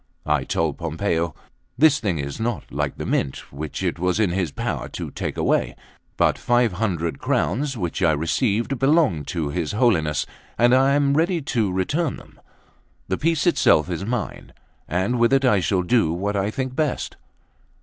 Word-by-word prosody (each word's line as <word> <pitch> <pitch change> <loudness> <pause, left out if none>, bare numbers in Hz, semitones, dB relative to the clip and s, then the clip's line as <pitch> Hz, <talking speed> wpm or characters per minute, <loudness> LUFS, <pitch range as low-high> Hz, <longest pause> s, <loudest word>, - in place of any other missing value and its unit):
I 75 -3 +1
told 80 +2 -1
Pompeo: 85 0 -1 0.4
"This 145 +1 +5
thing 95 -7 -1
is 70 -1 -5
not 115 0 -2
like 75 0 -2
the - - -4
Mint, 65 - -2
which 75 +2 -5
it - - -1
was 90 +3 0
in 105 -5 +2
his 90 -2 0
power - - -3
to - - -6
take - - -4
away; - - +1 0.4
but - - +2
five 120 -2 +2
hundred 90 -5 -2
crowns 135 +6 0
which 90 -2 -3
I 85 -3 +4
received 110 - 0
belong 135 - +3
to 80 -3 -2
his 85 +2 -2
Holiness, 85 - +2 0.3
and 120 +1 +4
I 135 +2 +4
am 140 -1 +2
ready 170 +3 +2
to 115 -7 0
return 145 - 0
them; - - -16 0.7
the 95 - 0
piece 165 -2 +1
itself 90 - +3
is 85 +2 -3
mine, 115 0 -4 0.3
and 95 +9 0
with 120 +1 +4
it 135 0 +3
I 105 -6 +4
shall 90 0 +1
do 90 -4 +2
what 100 +5 -2
I 100 +1 0
think 130 +3 -4
best." 150 -3 -1
100 Hz, 175 wpm, -23 LUFS, 85-130 Hz, 0.7 s, This